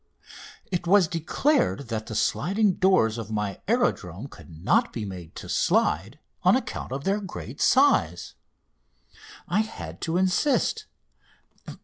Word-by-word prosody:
It 175 Hz, -1 st, -2 dB
was 190 Hz, -1 st, +5 dB
declared 165 Hz, -, 0 dB
that 110 Hz, -2 st, -3 dB
the 110 Hz, -, -6 dB
sliding 195 Hz, -, +1 dB
doors 150 Hz, -, +3 dB
of 110 Hz, -1 st, -6 dB
my 105 Hz, -2 st, -3 dB
aerodrome 135 Hz, -, -1 dB
could -, -, -14 dB
not 80 Hz, +3 st, +1 dB
be 110 Hz, -3 st, -4 dB
made 90 Hz, -4 st, -9 dB
to -, -, -8 dB
slide -, -, +1 dB, 0.2 s
on -, -, +5 dB
account -, -, -4 dB
of 135 Hz, +1 st, -4 dB
their 200 Hz, +4 st, +1 dB
great 130 Hz, -, -8 dB
size. 85 Hz, +2 st, +3 dB, 1.1 s
I 180 Hz, +5 st, +1 dB
had 85 Hz, -, -5 dB
to 165 Hz, +1 st, -1 dB
insist. 275 Hz, -, +1 dB
140 Hz, 130 wpm, -25 LUFS, -, 1.1 s, was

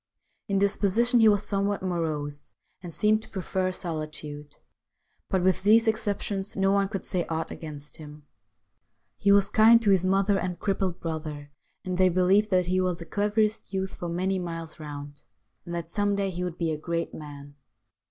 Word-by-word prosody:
In 195 Hz, -, 0 dB
disposition 205 Hz, +4 st, +3 dB
he 225 Hz, -, +6 dB
was 205 Hz, -1 st, +2 dB
somewhat 200 Hz, -1 st, -1 dB
morose, 150 Hz, -5 st, -3 dB, 0.3 s
and 175 Hz, -2 st, -8 dB
seemed 215 Hz, +5 st, +2 dB
to -, -, -16 dB
prefer 185 Hz, -1 st, -2 dB
solitude. 155 Hz, -4 st, -5 dB, 0.7 s
But 190 Hz, -2 st, +1 dB
with 185 Hz, 0 st, +2 dB
these 225 Hz, +3 st, +5 dB
exceptions, 205 Hz, -2 st, -2 dB
no 195 Hz, 0 st, +3 dB
one 200 Hz, 0 st, +2 dB
could 195 Hz, -, -4 dB
say 180 Hz, -3 st, 0 dB
aught 160 Hz, 0 st, -2 dB
against 150 Hz, -3 st, -9 dB
him. 150 Hz, -1 st, -11 dB, 0.9 s
He 200 Hz, -, +2 dB
was 200 Hz, 0 st, +4 dB
kind 225 Hz, +2 st, +7 dB
to 205 Hz, -, +4 dB
his 190 Hz, -2 st, +3 dB
mother 195 Hz, +1 st, +2 dB
and 180 Hz, -1 st, -3 dB
crippled 190 Hz, -2 st, -1 dB
brother, 155 Hz, -3 st, -5 dB, 0.3 s
and 185 Hz, 0 st, -3 dB
they 185 Hz, 0 st, +5 dB
believed 185 Hz, +4 st, +3 dB
that 185 Hz, -2 st, +2 dB
he 185 Hz, +1 st, +1 dB
was 180 Hz, -2 st, 0 dB
the 170 Hz, -, -8 dB
cleverest 210 Hz, +2 st, 0 dB
youth 190 Hz, 0 st, -2 dB
for 175 Hz, -, -5 dB
many 185 Hz, +3 st, -1 dB
miles 165 Hz, -2 st, -6 dB
round, 145 Hz, -1 st, -8 dB, 0.5 s
and 170 Hz, -, -4 dB
that 170 Hz, -1 st, -5 dB
some 205 Hz, 0 st, +1 dB
day 200 Hz, -1 st, -1 dB
he 180 Hz, 0 st, -4 dB
would 175 Hz, -2 st, -4 dB
be 165 Hz, -2 st, -1 dB
a 155 Hz, -, -3 dB
great 170 Hz, +1 st, -3 dB
man. 145 Hz, -2 st, -10 dB
185 Hz, 180 wpm, -27 LUFS, 160-200 Hz, 0.9 s, kind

